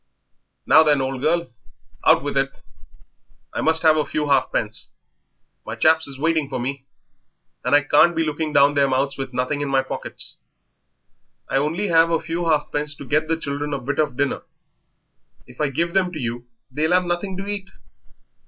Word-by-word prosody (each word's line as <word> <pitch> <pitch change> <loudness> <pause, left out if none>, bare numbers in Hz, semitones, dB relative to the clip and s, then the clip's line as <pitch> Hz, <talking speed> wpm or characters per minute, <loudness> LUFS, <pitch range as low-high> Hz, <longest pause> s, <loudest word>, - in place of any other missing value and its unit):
"Now, 160 - +7
then, 150 -3 +3
old 130 -1 -3
girl, 165 -1 0 0.5
out - - +5
with - - -3
it! - - +1 1.0
I - - -2
must 160 +1 +2
have 155 -1 +5
a 155 - +2
few 150 +1 -3
halfpence; 115 -5 0 0.7
my - - -6
chaps 160 0 +3
is 135 -1 -6
waiting 160 -1 0
for 130 -2 -3
me, 135 +2 -4 0.8
and 125 +4 +3
I 145 - +5
can't 150 +4 +4
be 165 - +1
looking 155 0 -2
down 140 0 +5
their 140 -1 +3
mouths 135 +1 0
with 135 -1 -5
nothing 130 +3 -2
in 145 - -2
my 135 -1 +2
pockets." 130 - -5 1.1
"I - - 0
only 165 +8 -1
have 165 0 +5
a 165 -1 +1
few 170 +2 -3
halfpence 150 -1 -1
to 140 - -10
get 155 +3 +1
the 165 0 0
children 145 -1 -3
a - - -3
bit 140 +4 -3
of 145 -5 0
dinner; 140 0 0 1.0
if 125 +3 -10
I 150 - +1
give 170 +5 -1
them 190 -2 +1
to 155 - -5
you 120 -1 -4 0.2
they'll 155 +5 0
have 180 0 +3
nothing 175 +2 -3
to 195 - -5
eat." 200 -1 -4
150 Hz, 185 wpm, -22 LUFS, 135-165 Hz, 1.1 s, Now